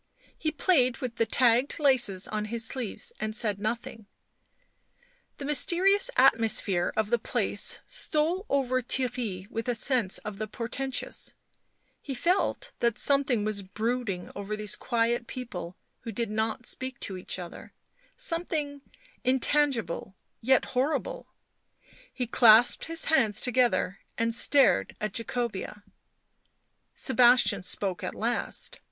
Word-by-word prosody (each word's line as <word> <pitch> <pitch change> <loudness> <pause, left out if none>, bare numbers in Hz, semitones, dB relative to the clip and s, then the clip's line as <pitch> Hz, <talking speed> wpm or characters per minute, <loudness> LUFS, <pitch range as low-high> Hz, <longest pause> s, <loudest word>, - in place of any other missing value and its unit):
He 315 - -2
played 280 -5 +2
with 250 -3 -6
the 230 - +1
tagged 245 +2 +3
laces 240 - +2
on 210 0 -3
his 225 +1 -3
sleeves 260 - -4
and 215 0 -3
said 210 -4 -1
nothing. 220 0 -4 1.3
The 280 - -7
mysterious 370 - +3
atmosphere 225 -8 +4
of 220 0 0
the 240 - +3
place - - +2
stole 335 +7 -1
over 255 -2 +1
Theirry 245 -7 -2
with 225 +2 -4
a 245 - +1
sense 230 -5 +1
of 210 -1 -8
the 215 - -3
por 230 +2 -5
tentous; 265 +1 -4 0.7
he 275 - -5
felt 375 - 0
that 235 -2 +1
something 275 -6 +2
was 215 -1 -2
brooding 210 -1 -3
over 200 +1 -4
these 210 -2 -1
quiet 235 0 -1
people 185 -9 -7 0.2
who 230 - -7
did 225 0 -3
not 220 +2 -2
speak 260 0 -5
to 195 - -4
each 185 - -4
other, 175 -2 -9 0.5
something 325 - -3 0.4
intangible, 255 - 0 0.3
yet 260 +2 +3
horrible; 310 - -1 0.8
he 250 - -3
clasped 235 0 +6
his 330 0 0
hands 225 -10 +2
together 235 -6 +1 0.2
and 230 0 0
stared 240 - +3
at 215 -2 -3
Jacobea. 230 -3 -4 1.1
Sebastian 245 -3 +4
spoke 185 -1 -2
at - - -4
last. 235 +2 -2
240 Hz, 130 wpm, -28 LUFS, 215-270 Hz, 1.3 s, clasped